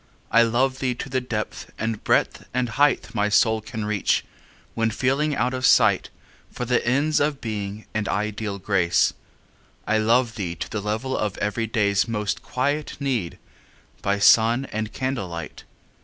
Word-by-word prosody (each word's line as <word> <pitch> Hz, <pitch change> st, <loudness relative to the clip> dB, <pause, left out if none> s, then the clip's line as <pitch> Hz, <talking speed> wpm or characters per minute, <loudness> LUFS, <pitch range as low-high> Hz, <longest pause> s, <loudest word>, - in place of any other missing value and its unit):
I 115 Hz, -, +6 dB
love 130 Hz, +3 st, +1 dB
thee 125 Hz, -2 st, -1 dB
to 135 Hz, -, -6 dB
the 130 Hz, 0 st, 0 dB
depth 115 Hz, -4 st, -5 dB
and 110 Hz, -1 st, -3 dB
breadth -, -, +1 dB
and 125 Hz, -1 st, +1 dB
height 145 Hz, +5 st, +2 dB
My 105 Hz, 0 st, +1 dB
soul 110 Hz, +1 st, +3 dB
can 110 Hz, 0 st, -5 dB
reach, 105 Hz, -2 st, +1 dB, 0.5 s
when 115 Hz, 0 st, +1 dB
feeling 135 Hz, +6 st, 0 dB
out 125 Hz, +1 st, 0 dB
of 130 Hz, 0 st, -4 dB
sight -, -, +4 dB, 0.4 s
For 125 Hz, -, -4 dB
the 125 Hz, 0 st, +1 dB
ends 140 Hz, +6 st, +2 dB
of 145 Hz, -1 st, 0 dB
Being 105 Hz, -1 st, -5 dB
and 110 Hz, -2 st, -1 dB
ideal 105 Hz, 0 st, -2 dB
Grace. 95 Hz, -3 st, +2 dB, 0.7 s
I 110 Hz, +1 st, +2 dB
love 115 Hz, +1 st, +2 dB
thee 90 Hz, -5 st, -3 dB
to -, -, -5 dB
the 110 Hz, -, -4 dB
level 110 Hz, +6 st, -2 dB
of 105 Hz, -2 st, -2 dB
everyday's 105 Hz, -1 st, 0 dB
Most 105 Hz, -3 st, -2 dB
quiet 145 Hz, +4 st, -2 dB
need, 125 Hz, -, -2 dB, 0.6 s
by 100 Hz, +1 st, +1 dB
sun 115 Hz, +5 st, +5 dB
and 110 Hz, 0 st, -3 dB
candlelight. 95 Hz, -, -4 dB
115 Hz, 155 wpm, -24 LUFS, 105-130 Hz, 0.7 s, I